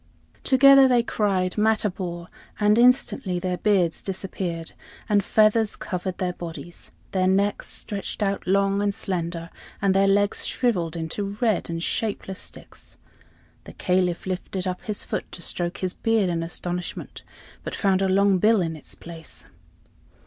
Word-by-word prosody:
Together 275 0 +7
they 245 -2 +3
cried 195 -4 0
"Matabor," 190 -5 0 0.3
and 210 +1 +4
instantly 245 -5 +3
their 180 0 -2
beards 185 -6 +2
disappeared, 180 -3 -4 0.4
and 205 -1 +3
feathers 215 0 +3
covered 180 0 -4
their 185 -2 -1
bodies; 170 0 -9 0.2
their 185 -1 +1
necks 200 +2 +1
stretched 205 +1 -4
out 200 -1 -1
long 195 +1 +2
and 200 -1 0
slender, 170 -2 -4 0.3
and 195 -1 +2
their 195 +1 +4
legs 205 +1 +2
shriveled 180 -10 0
into 195 +5 -4
red 220 -8 +1
and 165 0 -3
shapeless 200 -3 -3
sticks. - - -12 0.7
The - - -10
Caliph 180 -2 0
lifted 185 0 -3
up 180 -1 -3
his 210 -2 -3
foot - - -4
to 175 - -7
stroke 175 0 -2
his 185 -1 -2
beard 220 -5 +1
in 165 -1 -1
astonishment, 175 +1 -5 0.4
but - - -5
found 195 -2 +2
a 190 - +2
long 195 0 +3
bill 220 +2 +4
in 165 -3 -1
its 155 - -11
place. 165 -1 -11
190 Hz, 150 wpm, -24 LUFS, 175-205 Hz, 0.7 s, Together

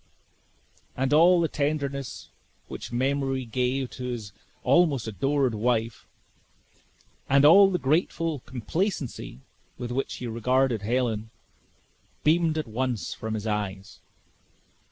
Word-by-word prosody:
And 135 +2 0
all 175 +3 +6
the 165 - +2
tenderness 140 -3 -3 0.4
which - - -8
memory 135 +1 0
gave 125 +3 -1
to 125 - -7
his 115 -5 -5 0.3
almost 145 -10 +3
adored 130 +5 0
wife, 115 +1 -1 1.2
and 140 +1 +5
all 195 +6 +8
the 185 - 0
grateful 160 +1 0
complacency 130 - -3 0.4
with 120 -1 -5
which 135 +2 -2
he 125 - -7
regarded 120 0 +1
Helen, 110 -1 -1 0.9
beamed 160 0 +3
at 155 - -1
once 120 -3 -2
from 110 0 -4
his 110 0 -5
eyes. 100 -3 -4
130 Hz, 115 wpm, -26 LUFS, 115-145 Hz, 1.2 s, all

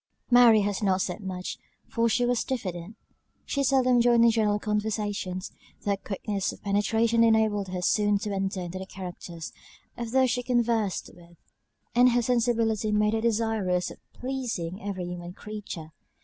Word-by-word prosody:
Mary 240 -3 +7
had 205 0 -1
not 190 -2 +2
said - - -2
much, 185 -2 -5 0.3
for 230 0 +1
she 245 +2 +2
was 245 -1 +1
diffident; 190 -5 -4 0.5
she 280 - -1
seldom 255 -2 +4
joined 235 -1 +5
in 230 - +6
general 215 -2 +2
conversations; 210 -3 -2 0.3
though 205 - 0
her 200 - +1
quickness 200 0 -3
of - - -14
penetration 225 +3 +2
enabled 220 -3 +3
her 180 -1 -4
soon 205 +2 +3
to 205 0 -4
enter 195 -1 -2
into 180 +1 -5
the 190 - -6
characters 175 -3 -8 0.4
of 235 -1 -5
those 260 0 +3
she 245 - 0
conversed 235 -5 0
with; 170 -1 -18 0.6
and 245 0 +5
her 245 - +3
sensibility 230 -3 +1
made 210 0 +2
her 225 - 0
desirous 220 -5 0
of - - -12
pleasing 235 -8 -4
every 195 -4 -4
human 175 0 -6
creature. 200 -6 -8
210 Hz, 165 wpm, -27 LUFS, 190-230 Hz, 0.6 s, Mary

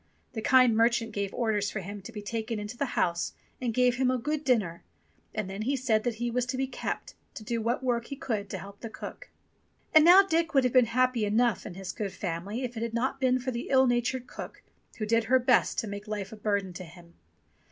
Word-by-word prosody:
The 220 - -4
kind 250 -1 +5
merchant 230 0 +2
gave 200 -2 -2
orders 215 -4 0
for 215 - -4
him 200 +2 -7
to 195 - -9
be 210 -2 -7
taken 225 +1 -3
into 210 +3 -6
the 280 - -1
house 170 -1 0 0.3
and 245 -2 0
gave 250 +1 +2
him 260 -1 +2
a 255 - +2
good 300 +5 -2
dinner, 215 - +1 0.5
and 215 -3 -3
then 195 +2 -5
he 265 +6 0
said 230 -5 +1
that 240 -2 0
he 240 +1 -2
was 245 +1 0
to 255 - -2
be 265 - +1
kept, 265 - -5 0.2
to 220 - -7
do 230 +1 -2
what 235 +4 -1
work 235 -2 0
he 280 - -5
could 220 -9 -3
to - - -4
help 200 +1 -10
the 230 - -6
cook. - - -9 0.6
And 310 -1 +8
now 360 +4 +9
Dick 330 -4 0
would 270 - +5
have 250 - +1
been 255 -2 +6
happy 250 0 +2
enough 220 +1 +1
in - - -7
this 190 0 -6
good 200 -3 -4
family 195 +7 -4
if 245 -1 -4
it 225 - -4
had 230 0 -3
not 260 +3 -1
been 255 -1 +3
for 255 +1 -3
the 235 0 -5
ill 265 -1 +5
natured 245 +1 0
cook, - - -9 0.3
who 215 - -2
did 230 +1 +2
her 255 +3 +5
best 250 -1 +3
to 225 - -1
make 205 +1 -7
life 205 -2 -4
a - - -7
burden 200 -3 -1
to 180 - -7
him. 170 0 -15
230 Hz, 245 wpm, -28 LUFS, 210-255 Hz, 0.6 s, now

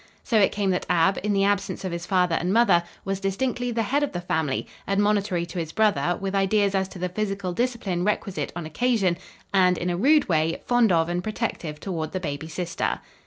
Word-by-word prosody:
So 225 - +2
it 195 - +4
came 200 -2 0
that 180 - -2
Ab, 180 +2 +3
in 210 - -1
the 195 -1 +2
absence 200 -1 0
of 185 - -2
his 170 0 -5
father 180 -3 +2
and 175 +2 0
mother, 225 -5 +5 0.2
was 195 -1 -2
distinctly 245 +6 -1
the 230 -1 0
head 275 +7 +1
of 290 - -1
the 175 - -2
family, 160 -5 -1 0.2
admonitory 200 -3 +1
to 175 +1 -6
his 160 -2 -4
brother, 175 -6 +2
with 195 0 -3
ideas 200 +1 +2
as 190 -1 +1
to 190 - -11
the 180 +1 -2
physical 195 -1 -2
discipline 220 -6 -1
requisite 200 -1 -1
on 175 -2 -4
occasion, 200 +1 +1 0.4
and, 180 -2 +4
in 175 +1 -1
a 175 - -1
rude 290 - +4
way, 160 -1 +1
fond 240 -4 +3
of 165 -1 +3
and 175 +1 -2
protective 210 -8 -3
toward 160 -4 -4
the 185 - -1
baby 155 -2 -4
sister. 170 +1 -2
190 Hz, 215 wpm, -25 LUFS, 175-210 Hz, 0.4 s, mother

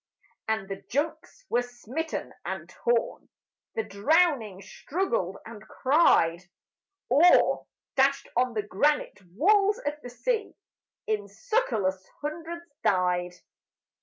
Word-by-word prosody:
And 220 -3 -1
the 195 0 -6
junks 315 - -3
were 245 - +2
smitten 245 +6 -5
and - - -5
torn, 485 +1 -1 0.5
The 450 - 0
drowning 225 - +2
struggled 230 - -2
and 225 -2 -10
cried, 255 - +3 0.7
Or, 325 +7 +5 0.3
dashed 275 0 +3
on 250 0 +1
the 210 - 0
granite 285 +10 +1 0.2
walls 405 - +4
of 290 - -2
the 245 - -8
sea, 455 - -2 0.5
In 210 -2 -1
succourless 200 - -1 0.2
hundreds 330 +3 -5 0.2
died. 180 -1 +1
260 Hz, 105 wpm, -27 LUFS, 205-335 Hz, 0.7 s, Or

